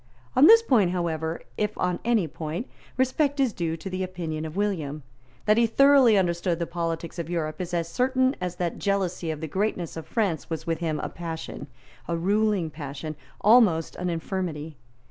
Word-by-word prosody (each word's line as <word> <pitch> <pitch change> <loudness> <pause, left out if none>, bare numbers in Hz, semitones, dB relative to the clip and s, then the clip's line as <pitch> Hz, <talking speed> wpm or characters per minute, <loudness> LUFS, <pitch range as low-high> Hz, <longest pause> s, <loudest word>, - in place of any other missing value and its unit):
On 280 +4 +8
this 455 +1 +8
point, 220 - +3
however, 165 -2 -2 0.2
if 210 0 -1
on 180 -1 0
any 225 -7 +2
point, 160 - -5 0.3
respect 275 +3 +1
is 260 -5 +2
due 165 -1 -2
to 165 - -8
the 185 0 -3
opinion 170 -4 -4
of 155 +1 -7
William. 160 -8 -2 0.4
That 215 +1 +4
he 235 0 +4
thoroughly 270 -2 +6
understood 175 -2 +1
the 170 - -2
politics 170 0 -4
of 165 -1 -4
Europe 165 0 -2
is 180 -1 -5
as 170 -2 -1
certain 260 +6 +1
as 180 -1 -3
that 175 -1 -3
jealousy 190 -4 -1
of 155 -1 -4
the 160 - -3
greatness 185 -1 -2
of 160 - -7
France 195 -10 -1
was 160 -1 -4
with 165 -1 -1
him 160 -3 -1
a - - -3
passion, 165 -3 -6 0.4
a 170 - -1
ruling 200 -1 +1
passion, 150 +1 -6 0.3
almost 210 -8 +4
an 180 0 -2
infirmity. 165 -3 -3
175 Hz, 185 wpm, -26 LUFS, 160-210 Hz, 0.4 s, On